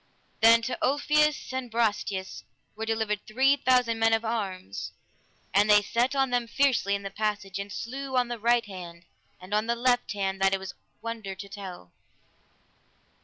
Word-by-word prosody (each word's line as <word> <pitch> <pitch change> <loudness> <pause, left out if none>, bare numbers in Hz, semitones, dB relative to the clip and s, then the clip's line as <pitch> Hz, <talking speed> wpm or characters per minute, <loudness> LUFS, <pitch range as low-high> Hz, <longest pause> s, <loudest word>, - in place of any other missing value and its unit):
Then 230 +1 +6
to 255 - -3
Ulfius 300 +1 +2
and 260 -2 -3
Brastias 205 -4 -1 0.3
were 220 +1 -5
delivered 220 -2 0
three 265 +6 +4
thousand 250 -4 +2
men 225 0 +4
of 225 +1 +1
arms, 190 - -4 0.6
and 205 +2 +4
they 210 0 +6
set 245 +6 0
on 270 -2 +1
them 245 -1 0
fiercely 235 -5 +2
in 200 - -5
the 195 - -5
passage, 205 -2 -2
and 200 +1 -6
slew 260 +4 -4
on 250 -1 +3
the 240 -1 -5
right 235 +2 +3
hand 175 -3 -10 0.3
and 185 +2 -9
on 215 +1 +1
the 235 - +1
left 245 -1 +1
hand 195 -1 -2
that 195 0 +4
it - - -4
was 190 -1 -7 0.3
wonder 225 -4 -5
to 195 +2 -8
tell. 190 - -9
225 Hz, 170 wpm, -27 LUFS, 200-245 Hz, 0.6 s, Then